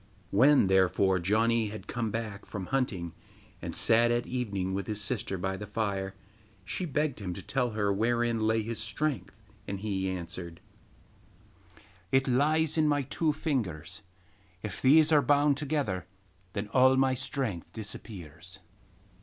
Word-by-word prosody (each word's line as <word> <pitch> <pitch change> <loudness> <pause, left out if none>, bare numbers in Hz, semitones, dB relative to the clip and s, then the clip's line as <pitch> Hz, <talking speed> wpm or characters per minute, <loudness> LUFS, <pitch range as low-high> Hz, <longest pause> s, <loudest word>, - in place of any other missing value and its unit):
When, 135 +4 +6
therefore, 95 0 +3
Janni 110 +5 +2
had 110 +1 -8
come 120 -2 -2
back 110 -2 -5
from 100 -3 -5
hunting, 95 -11 -1 0.5
and - - -5
sat 115 +1 +4
at 120 0 +1
evening 100 -7 -2
with 95 -1 -3
his 105 -1 -2
sister 105 -2 -2
by 95 +1 -2
the 105 - -7
fire, 100 -2 -2 0.5
she 180 - -3
begged 150 -4 -1
him 90 -4 -4
to - - -6
tell 125 -4 -1
her 100 -2 +2
wherein 115 +2 +1
lay 110 0 +2
his 115 +1 -4
strength, 130 +3 -2 0.3
and 100 -1 -4
he 95 -3 -1
answered: 85 -2 -6 1.5
'It 135 +1 +3
lies 155 +5 +2
in 155 - +4
my 145 -1 +2
two 155 +4 0
fingers; 100 - -3 0.6
if 105 -1 -5
these 150 +4 +6
are 150 -2 +6
bound 145 +1 +3
together 140 - -2 0.5
then 100 0 -3
all 130 +2 +5
my 130 0 +3
strength 125 - -3
disappears. 90 -4 -7
110 Hz, 145 wpm, -29 LUFS, 95-135 Hz, 1.5 s, When